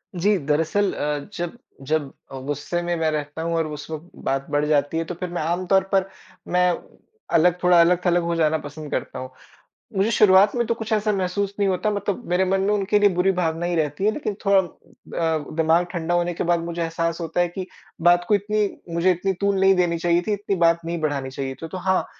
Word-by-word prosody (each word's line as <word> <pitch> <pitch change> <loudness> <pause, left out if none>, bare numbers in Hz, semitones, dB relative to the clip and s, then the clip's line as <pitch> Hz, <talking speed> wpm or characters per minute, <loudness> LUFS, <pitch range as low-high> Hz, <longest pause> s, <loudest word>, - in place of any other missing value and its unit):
जी, 200 +3 +2
दरअसल 165 +7 +1
अ, 145 +2 -3
जब 175 +6 -4 0.3
जब 150 -3 0 0.2
अ, 135 - -6
गुस्से 145 +5 -3
में 175 0 -1
मैं 160 -1 +1
रहता 150 +1 -4
हूँ 165 0 -1
और 160 -1 0
उस 150 0 -8
वक़्त 160 +3 -7 0.2
बात 135 0 0
बढ़ 145 0 +1
जाती 150 +1 +1
है 165 - 0
तो 175 - -5
फिर 180 +1 -5
मैं 175 - -3
आमतौर 180 +4 +1
पर 195 0 +2 0.4
मैं 180 0 +3 0.6
अलग 175 +2 +5
थोड़ा 180 -1 +6
अलग-थलग 175 0 +3
हो 170 0 -1
जाना 160 -1 +2
पसंद 150 0 -9
करता - - -3
हूँ। 130 0 -6 0.7
मुझे 205 +4 +2
शुरुआत 200 0 +5
में 240 - +1
तो 230 - +2
कुछ 225 0 -7
ऐसा 215 0 +1
महसूस 195 +1 -1
नहीं 200 - +2
होता 190 +3 0
मतलब, 205 +3 -3
मेरे 180 +2 +2
मन 190 +1 +1
में 205 +2 +1
उनके 205 0 +2
लिए 205 - +5
बुरी 180 +2 +3
भावना 170 -2 -1
ही 175 0 -1
रहती 155 +4 -1
है 215 - +4
लेकिन 215 -5 -3
थोड़ा 200 0 +5
अ, 165 -3 -3
दिमाग़ 165 +2 +3
ठंडा 170 -1 -2
होने 175 0 +1
के - - -3
बाद 175 0 +2
मुझे 170 0 -4
एहसास 165 0 -1
होता 165 +1 -3
है 175 - +2
कि 185 +2 -6 0.3
बात 175 +1 +4
को 210 - +4
इतनी 210 +1 0 0.3
मुझे 175 +2 +3
इतनी 185 +2 -1
तूल 200 -1 +2
नहीं 195 0 +5
देनी 175 -2 +1
चाहिए 170 +1 +2
थी, 215 - +1
इतनी 205 -1 -2
बात 170 -1 +3
नहीं 170 0 -3
बढ़ानी 140 -3 -1
चाहिए 135 -1 -4
थी। 165 - -5
तो 185 - -6
हाँ, 185 +1 +1
175 Hz, 225 wpm, -23 LUFS, 160-190 Hz, 0.7 s, थोड़ा